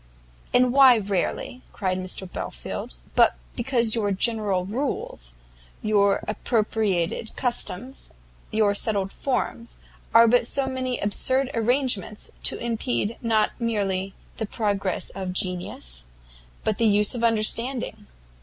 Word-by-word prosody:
"And 245 0 +4
why 265 -3 +8
rarely," 205 +4 -2
cried 185 -2 -2 0.3
Belfield, - - -5 0.2
"but - - +5 0.2
because 235 -4 +2
your 210 -3 +1
general 200 -2 +1
rules, 205 - -3 0.5
your 200 -2 +3
appropriated 215 -3 -1
customs, 245 0 -2 0.4
your 215 -2 +3
settled 200 -2 +1
forms, 250 -3 -3 0.3
are 230 0 +7
but 240 0 +4
so 275 +1 +2
many 255 -1 -2
absurd 260 +6 +1
arrangements 230 -3 0
to - - +2
impede 235 -1 -2
not 220 -2 +2
merely 195 -5 -1 0.2
the 220 - -3
progress 200 -3 -1
of 185 -2 -5
genius, 175 - -1 0.6
but 215 - -1
the 230 - +4
use 210 0 +4
of 240 -2 -2
understanding? 230 0 0
215 Hz, 115 wpm, -25 LUFS, 195-240 Hz, 0.6 s, why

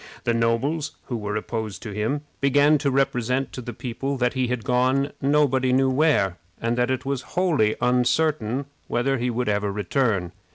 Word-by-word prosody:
The 120 - +1
nobles 130 +7 0 0.2
who 125 - -2
were 105 -2 -3
opposed 110 -1 -4
to 110 - -6
him 110 +8 -1 0.2
began 145 +2 +4
to 140 0 +1
represent 130 -1 0
to 125 - -5
the 120 - -6
people 135 +4 -4
that 125 -1 +1
he 130 -1 0
had 125 -2 -2
gone 130 +3 +1
nobody 135 -2 +2
knew 130 +1 +3
where, 130 - +2 0.2
and 115 +1 0
that 125 +1 +1
it 130 0 -1
was 135 -2 -1 0.2
wholly 155 -13 +2
uncertain 125 0 +1 0.2
whether 130 +2 0
he 125 +1 0
would 125 +1 -2
ever 105 -1 0
return. 100 -2 0
125 Hz, 175 wpm, -24 LUFS, 115-140 Hz, 0.2 s, began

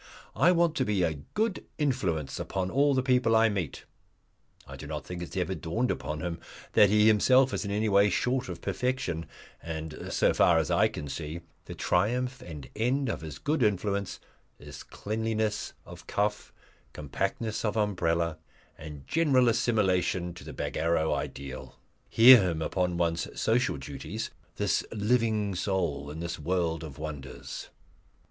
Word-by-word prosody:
"I 180 - +5
want 170 -2 +3
to 130 - +2
be 105 -6 +1
a 80 -4 -1 0.2
Good 215 -2 0
Influence 100 - -1
upon 95 -1 -3
all 140 +2 +3
the 130 - +1
people 125 -3 +3
I 110 0 +5
meet." 95 -8 -4 0.8
I 70 - -9
do 70 - -9
not 75 -2 -5
think 90 +4 -6
it 85 - -7
has - - -4
ever 90 +1 -1
dawned 95 +9 -1
upon 75 +3 -4
him 85 -1 -4 0.3
that 105 - +6
he 105 +1 +4
himself 125 +5 +5
is - - -2
any 105 +2 0
way 100 0 +5
short 125 +4 0
of 85 - -6
perfection; 125 -11 -2 0.3
and, 80 -1 -6
so - - +3
far - - +4
as - - 0
I - - +4
can 75 - -7
see, 80 +4 -5 0.2
the - - -8
triumph 125 +8 0
and 75 -5 -9
end 125 +4 0
of - - -3
his 80 -2 -7
good 150 0 -1
influence 100 -2 0 0.4
is - - -10
cleanliness 110 0 -2
of - - -12
cuff, 105 +1 -1 0.4
compactness 100 - -3
of 110 0 -1
umbrella, 85 -6 0 0.4
and 75 -3 -9
general 135 -7 +3
assimilation 95 -6 +1
to 85 - -11
the - - -8
Bagarrow 80 -1 0
ideal. 70 -1 -6 0.3
Hear 120 +1 +9
him 85 -4 -1
upon 90 -1 -1
one's 85 -1 -1
social 120 - +1
duties 80 - -6 0.2
this 105 -1 +1
living 110 -2 +1
soul 90 -6 -1
in 80 +2 -7
this 85 -1 -4
world 80 0 -1
of 75 -4 -8
wonders! 75 -4 -7
95 Hz, 160 wpm, -28 LUFS, 80-115 Hz, 0.8 s, Hear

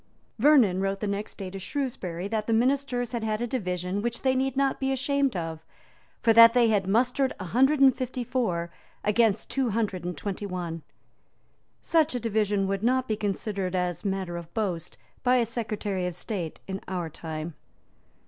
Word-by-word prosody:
Vernon 230 -9 +5
wrote 195 0 -1
the 210 - -2
next 200 +1 -3
day 190 -3 -6
to 195 - -6
Shrewsbury 190 - -3
that 215 0 -2
the 230 - +2
ministers 245 0 +1
had 235 -2 -2
had 215 -1 -1
a 240 - -1
division 185 -5 -2
which 235 +1 -3
they 260 -1 +3
need 265 0 0
not 275 -1 +1
be 265 0 0
ashamed 275 -1 +1
of; 165 -2 -4 0.6
for 225 - +5
that 230 +1 +9
they 240 -2 +5
had 200 -3 +1
mustered 250 +6 +2
a - - -4
hundred 270 - +3
and 265 -2 +7
fifty 255 -1 -3
four 180 -10 -1 0.3
against 215 0 +2
two 265 -3 +1
hundred 205 -5 -1
and 175 -2 -4
twenty 200 +2 -4
one. 175 -3 -4 1.0
Such 315 -4 +2
a - - 0
division 210 -3 +1
would 195 0 -1
not 255 +3 +2
be 215 - 0
considered 200 -2 -2
as 180 -1 -1
matter 190 -3 -2
of 170 -1 -9
boast 185 -7 -2 0.2
by 250 0 +3
a 240 -2 +3
Secretary 210 -5 -2
of 180 - -4
State 180 -4 -4
in 195 0 -4
our 180 -3 -3
time. 160 +1 -6
215 Hz, 185 wpm, -27 LUFS, 185-250 Hz, 1.0 s, that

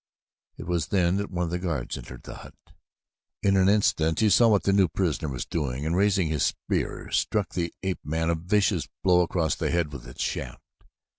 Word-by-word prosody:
It - - -8
was 85 -3 -1
then 90 -1 +2
that 100 0 -3
one 90 -1 -2
of 85 - -3
the 90 - -1
guards 80 -9 -3
entered 60 - -10
the - - -9
hut. - - -12 0.9
In 100 -1 +3
an 95 0 +4
instant 80 -6 +2
he 110 -2 +3
saw 120 - +6
what 105 -3 +3
the 100 - +2
new 95 -2 +4
prisoner 80 -4 -1
was 60 -3 -4
doing 70 -3 -3
and 80 +2 0
raising 95 -2 +2
his 75 -3 -1
spear, - - -2
struck 105 -2 0
the 85 -2 -2
ape 95 -1 -3
man 80 +2 -1
a - - +2
vicious 95 +5 +1 0.2
blow 90 -1 +5
across 85 -4 0
the - - -2
head 85 -4 0
with 65 -4 -8
its - - -5
shaft. - - -4
85 Hz, 210 wpm, -26 LUFS, 80-95 Hz, 0.9 s, saw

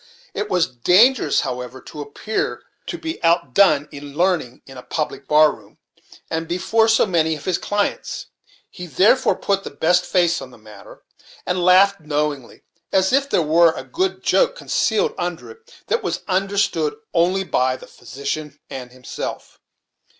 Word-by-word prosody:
It 210 0 -3
was 180 -2 +2
dangerous, 180 - +3
however, 125 0 -5
to 150 +3 -9
appear 145 +9 -3 0.2
to 345 - -4
be 325 - -6
out 165 -6 +2
done 155 -7 +4
in 145 0 -10
learning 175 -9 0
in 135 - -13
a 125 - -8
public 140 +1 -4
bar 150 0 +5
room, - - -16 0.5
and 165 0 -3
before 190 +6 +1
so 225 0 +4
many 160 -5 +1
of 150 - -11
his 185 -2 0
clients; 205 0 -2 0.5
he 180 - -9
therefore 210 - +3
put 195 -1 -1
the - - -6
best 175 +5 +2
face 175 -3 +1
on 135 - -9
the 120 - -16
matter, 105 -2 -15 0.4
and 180 0 -1
laughed 195 +2 +5
knowingly 150 -4 -3 0.3
as 190 +3 +2
if 275 +1 +2
there 170 - +2
were 165 +2 +4
a - - -7
good 375 +2 -2
joke - - +2
concealed 460 -2 0
under 175 - -4
it, 455 +1 -18
that 470 - 0
was - - -3
understood 190 -4 0 0.2
only 180 +3 +2
by 130 -7 +1
the - - -13
physician 145 +2 -6
and 125 -2 -7
himself. 125 -1 -7
170 Hz, 165 wpm, -21 LUFS, 145-200 Hz, 0.5 s, bar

